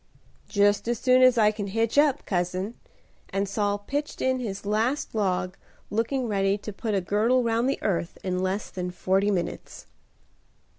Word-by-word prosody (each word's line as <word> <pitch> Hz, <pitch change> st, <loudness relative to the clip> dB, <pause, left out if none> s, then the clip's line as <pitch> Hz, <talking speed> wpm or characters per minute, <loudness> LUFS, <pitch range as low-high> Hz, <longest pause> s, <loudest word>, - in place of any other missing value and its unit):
"Just 205 Hz, +1 st, +2 dB
as 240 Hz, 0 st, 0 dB
soon 255 Hz, +2 st, +4 dB
as 255 Hz, -1 st, +6 dB
I 210 Hz, -2 st, +5 dB
can 210 Hz, -2 st, -5 dB
hitch 225 Hz, +3 st, 0 dB
up, 290 Hz, -2 st, +3 dB
cousin;" 185 Hz, +3 st, -1 dB, 0.6 s
and 195 Hz, +1 st, -1 dB
Saul 205 Hz, 0 st, 0 dB
pitched 285 Hz, +8 st, -4 dB
in 260 Hz, 0 st, +1 dB
his 200 Hz, -5 st, -5 dB
last 225 Hz, +7 st, 0 dB
log, 185 Hz, -4 st, -1 dB, 0.4 s
looking 235 Hz, +4 st, 0 dB
ready 195 Hz, -1 st, +1 dB
to 210 Hz, +1 st, -7 dB
put 215 Hz, +1 st, -2 dB
a 195 Hz, -, +1 dB
girdle 220 Hz, +7 st, +2 dB
round 230 Hz, +2 st, +1 dB
the -, -, 0 dB
earth 175 Hz, -3 st, -1 dB
in 180 Hz, -1 st, -1 dB
less 190 Hz, +3 st, -2 dB
than 180 Hz, -1 st, -4 dB
forty 190 Hz, +3 st, +1 dB
minutes. 180 Hz, -4 st, -3 dB
205 Hz, 165 wpm, -26 LUFS, 195-235 Hz, 0.6 s, as